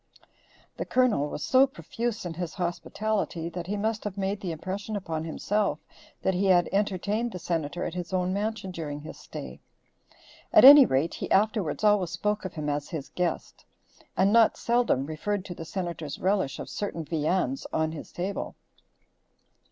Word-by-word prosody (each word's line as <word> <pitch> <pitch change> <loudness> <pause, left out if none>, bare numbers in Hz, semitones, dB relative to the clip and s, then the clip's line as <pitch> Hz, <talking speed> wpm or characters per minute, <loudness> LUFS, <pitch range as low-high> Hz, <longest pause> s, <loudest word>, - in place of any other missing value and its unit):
The - - -3
Colonel 230 - +2
was 150 - -5
so 265 +1 +5
profuse 240 -6 -4
in 175 - -3
his 170 0 -5
hospitality 180 -1 -2
that 175 0 -6
he 205 +2 -2
must 215 +1 -1
have 210 -1 -5
made 195 +1 -2
the 180 - -3
impression 190 +6 -4
upon 165 -5 -3
himself 205 +5 0 0.5
that 190 - +2
he 190 +2 +1
had 175 -2 +5
entertained 205 +4 0
the 185 - -6
Senator 165 -1 -2
at 165 - -3
his 175 0 -5
own 185 0 0
mansion 205 -1 -2
during 150 -4 -5
his 155 - -10
stay; - - -8 0.9
at - - +8
any 280 -1 +11
rate, 135 +5 +1
he - - -5
afterwards 210 -4 +1
always 205 -4 +4
spoke 210 +5 -1
of 185 - -6
him 155 -2 -4
as 145 0 -2
his 150 -4 -5
guest, 180 -2 -3 0.5
and 195 +2 +4
not 230 -1 +5
seldom 235 - +1
referred 185 +6 -3
to 180 - -6
the 165 - -8
Senator's 170 -5 -4
relish 190 -7 0
of - - -6
certain 170 -6 -4
viands 155 -2 -1
on 160 0 0
his 155 -2 -8
table. 190 +3 -4
185 Hz, 170 wpm, -27 LUFS, 165-210 Hz, 0.9 s, any